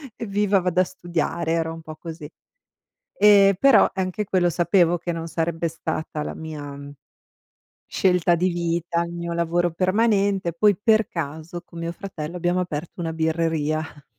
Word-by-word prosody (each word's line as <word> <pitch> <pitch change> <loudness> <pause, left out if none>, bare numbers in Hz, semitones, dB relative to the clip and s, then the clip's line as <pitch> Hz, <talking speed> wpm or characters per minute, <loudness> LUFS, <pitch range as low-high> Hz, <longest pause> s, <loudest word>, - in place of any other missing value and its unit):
"Evviva, 205 -3 +1
vado 180 0 0
a - - +4
studiare", 170 -2 -3
era 165 -1 0
un 165 0 -8
po' 155 -1 -9
così. 160 -2 -8 0.9
E 200 -2 +6
però 275 -1 +6
anche 190 +2 -2
quello 180 -2 +2
sapevo 175 0 +3
che 175 +1 -4
non 165 0 -4
sarebbe 165 0 -1
stata 155 -1 -4
la - - -5
mia 150 -3 -7 1.1
scelta 180 -2 +2
di 180 +2 +1
vita, 170 0 -1
il 170 0 -6
mio 170 0 -4
lavoro 170 +1 +1
permanente. 195 -1 +1
Poi 205 +3 +3
per 220 +1 +3
caso 160 +2 -5
con 170 - -12
mio 170 0 -3
fratello 175 -4 -7
abbiamo 175 +1 0
aperto 170 0 -5
una 165 -1 -2
birreria. 160 -1 0
F 140 -7 -12
170 Hz, 155 wpm, -23 LUFS, 160-185 Hz, 1.1 s, E